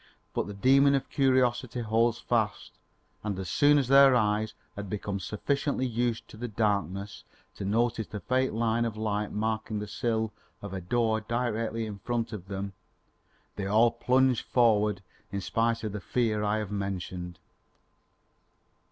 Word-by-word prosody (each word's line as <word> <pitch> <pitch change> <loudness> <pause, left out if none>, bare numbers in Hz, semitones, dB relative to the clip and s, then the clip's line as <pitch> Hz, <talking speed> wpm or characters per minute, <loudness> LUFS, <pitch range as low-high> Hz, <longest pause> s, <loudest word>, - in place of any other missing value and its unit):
But - - -1
the 100 - -7
demon 135 +6 +5
of 135 - -2
curiosity 130 -2 +2
holds 115 +1 +2
fast 110 -3 -1 0.5
and 105 -3 -2
as 95 -2 -4
soon 145 0 +5
as 135 -3 +1
their 135 0 +7
eyes 110 -1 +1 0.2
had 100 -1 -6
become 100 0 -3
sufficiently 135 +7 -1
used 120 -1 -1
to - - -12
the 120 +2 -4
darkness 100 -3 -1 0.3
to 100 - -6
notice 115 +2 +1
the 105 - -6
faint 130 +1 0
line 115 0 +1
of 115 -2 -3
light 105 -1 -1
marking 110 0 -2
the 105 - -3
sill 110 +1 -1 0.3
of 100 -2 -7
a 95 - -4
door 110 +3 +1
directly 115 -1 -2
in 105 -2 -7
front 115 +2 -2
of 95 -3 -7
them, 100 0 -4 0.8
they 100 -1 -2
all 110 +3 +4
plunged 130 +1 +2
forward 105 -5 +3 0.3
in 100 - -2
spite 115 +4 0
of 110 - -2
the 105 0 -5
fear 110 -3 0
I 105 +1 +1
have 105 -2 -4
mentioned. 90 -3 -4
110 Hz, 160 wpm, -28 LUFS, 105-120 Hz, 0.8 s, their